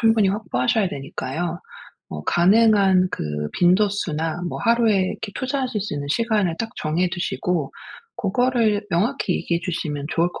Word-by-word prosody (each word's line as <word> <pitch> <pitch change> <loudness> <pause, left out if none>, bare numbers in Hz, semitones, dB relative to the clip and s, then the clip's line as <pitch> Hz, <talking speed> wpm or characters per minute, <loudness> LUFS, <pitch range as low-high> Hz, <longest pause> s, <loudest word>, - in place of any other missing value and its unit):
충분히 225 -3 +4
확보하셔야 200 - 0
되니까요. 155 +4 -4 0.5
어 75 -1 -6
가능한 195 -1 +4
그 - - -4 0.3
빈도수나 175 -4 +1
뭐 - - -5
하루에 230 -2 +3
이렇게 200 +2 -4
투자하실 260 -4 -2
수 210 - -5
있는 145 0 -4
시간을 210 -4 +1
딱 225 - -3
정해 170 +4 0
두시고 175 -4 -2 0.4
그거를 220 -1 +1
명확히 190 +2 0
얘기해 170 0 -1
주시면 150 -5 -3
좋을 170 +1 +2
것 - - -10
190 Hz, 340 characters per minute, -22 LUFS, 170-220 Hz, 0.5 s, 충분히